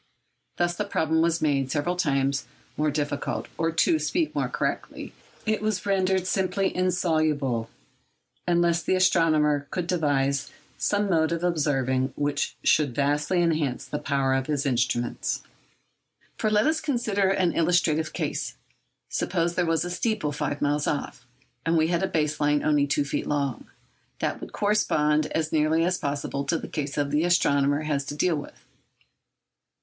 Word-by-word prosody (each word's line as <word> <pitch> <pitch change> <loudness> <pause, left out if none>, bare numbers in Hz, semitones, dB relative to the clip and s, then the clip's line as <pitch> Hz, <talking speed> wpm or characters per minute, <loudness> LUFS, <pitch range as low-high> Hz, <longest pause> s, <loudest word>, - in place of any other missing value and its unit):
Thus 175 0 +1
the 210 - -1
problem 160 -5 +1
was 170 0 +1
made 140 -3 +1
several 150 +5 0
hundred 180 - -9 0.2
times 135 0 0 0.3
more 150 0 +1
difficult—or, 150 +2 -2
to 170 - +2
speak 330 -1 0
more - - -1
correctly, - - -3 0.3
it 215 -2 0
was 215 -2 -1
rendered 190 -2 +1
simply 190 0 0
insoluble 155 -10 0 0.8
unless 170 -1 +2
the 185 - +1
astronomer 155 -5 +3
could 180 -2 -2
devise 140 -5 0 0.3
some 205 0 0
mode 160 -3 +2
of 170 0 -2
observing 135 -6 0
which 145 0 -1
should 145 -6 +3
vastly 145 +5 +1
enhance 155 -6 0
the 150 - -4
power 135 -2 0
of 130 0 0
his 150 -1 -1
instruments. 120 -2 -1 0.9
For 215 - 0
let 210 +1 +3
us 315 +1 +1
consider 230 -9 0
an 185 -3 +2
illustrative 160 -2 +2
case. - - -3 0.5
Suppose 170 +1 -1
there 175 -1 0
was 165 0 +1
a 175 - -4
steeple 180 -4 -1
five 145 0 -3
miles 145 0 +1
off, 125 -4 -3 0.4
and 165 0 +2
we 160 0 +2
had 170 -1 +1
a 190 - +1
base 155 -4 -1
line 145 0 +2
only 145 -2 +3
two 145 0 +1
feet 140 - -3
long. 140 -4 -2 0.5
That - - -2
would - - -8
correspond 155 -8 +2
as 160 -1 -2
nearly 160 +1 +2
as 180 +1 0
possible 140 0 -2
to 165 +4 +1
the - - -7
case 145 -2 -4
the 145 +1 +1
astronomer 145 -4 +2
has 145 -2 -1
to 145 - -5
deal 165 +3 +2
with. 145 - -8
155 Hz, 155 wpm, -26 LUFS, 145-175 Hz, 0.9 s, astronomer